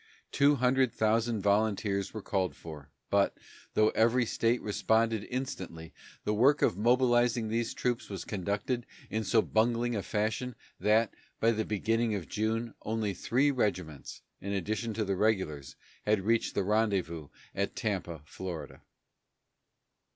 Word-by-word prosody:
Two 145 +1 +4
hundred 130 -1 +3
thousand 110 0 +1
volunteers 100 -1 +1
were 110 -2 -7
called 95 -7 -1
for, 75 -4 -10 0.2
but, 100 -1 +2 0.4
though 110 0 +5
every 120 +2 +3
state 115 +2 +1
responded 110 +1 +1
instantly, 95 -11 -5 0.3
the 105 - 0
work 130 +7 +4
of - - +3
mobilizing 120 0 +3
these 115 +1 -1
troops 120 -1 -1
was 95 -2 -5
conducted 105 +5 -2 0.2
in 110 0 -1
so 110 +1 +3
bungling 115 +2 +1
a 105 - -1
fashion 110 +5 -2 0.2
that, 105 +3 +3 0.3
by 115 - +4
the 110 -1 -1
beginning 115 +1 0
of 95 -5 -5
June, 110 +2 -1
only 110 -2 -1
three 130 +10 +2
regiments, 90 - -2 0.2
in 100 +1 -4
addition 110 +4 -2
to 110 0 0
the 95 0 0
regulars, 95 -9 0 0.3
had 105 -1 +2
reached 115 +3 +1
the 100 - +1
rendezvous 95 -7 0 0.3
at - - -2
Tampa, 80 -4 -3
Florida. 85 0 -7
110 Hz, 140 wpm, -30 LUFS, 100-115 Hz, 0.4 s, though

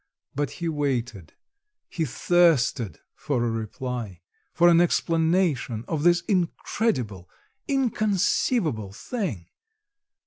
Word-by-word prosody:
but 145 +1 -1
he 170 - -4
waited, 130 - -2 0.5
he 165 - -2
thirsted 140 - +2
for 135 -6 -2
a 115 - 0
reply, 115 -3 -5 0.3
for 175 0 +4
an 170 0 +6
explanation 165 - +1
of 160 -3 -2
this 175 +2 +4
incredible, 165 - -1 0.4
inconceivable 210 - +1
thing. 145 - -4
150 Hz, 95 wpm, -25 LUFS, 115-175 Hz, 0.5 s, an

